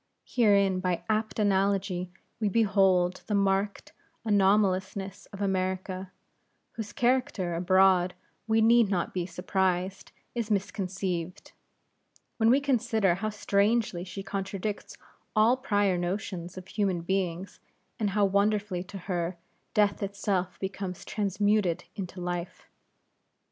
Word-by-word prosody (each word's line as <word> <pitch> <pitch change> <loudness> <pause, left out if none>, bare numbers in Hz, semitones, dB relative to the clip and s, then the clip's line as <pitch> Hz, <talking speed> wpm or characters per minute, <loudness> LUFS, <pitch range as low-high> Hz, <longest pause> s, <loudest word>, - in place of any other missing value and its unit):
Herein 200 -5 +3
by 180 -2 -1
apt 215 0 -1
analogy 195 -3 +1 0.3
we 215 -2 +1
behold 190 -4 +3
the 210 - 0
marked 200 0 0 0.3
anomalousness 195 -1 +1
of 200 0 -6
America; 185 0 -2 0.6
whose 220 -2 -6
character 240 -7 +1
abroad, 185 +1 +4 0.3
we 220 0 +3
need 230 -1 +5
not 180 -4 -1
be 180 -2 -2
surprised, 185 +1 -1 0.2
is 235 -3 -3
misconceived, 185 -3 -2 0.9
when 225 -1 +4
we 260 +4 +6
consider 230 -8 +2
how 205 +5 -2
strangely 205 -2 +1
she 190 +2 -7
contradicts 195 +1 -4 0.4
all 220 +3 +5
prior 205 -8 +1
notions 180 -1 -4
of 185 0 -9
human 190 -5 0
things; 185 0 -2 0.4
and 210 -2 +1
how 205 +1 +2
wonderfully 200 -1 +1
to 195 +1 -9
her, 175 -1 -3 0.4
Death 205 -2 +3
itself 195 -2 -2
becomes 190 -1 -5
transmuted 205 -3 +1
into 190 -2 -6
Life. 175 0 -5
195 Hz, 115 wpm, -28 LUFS, 185-210 Hz, 0.9 s, we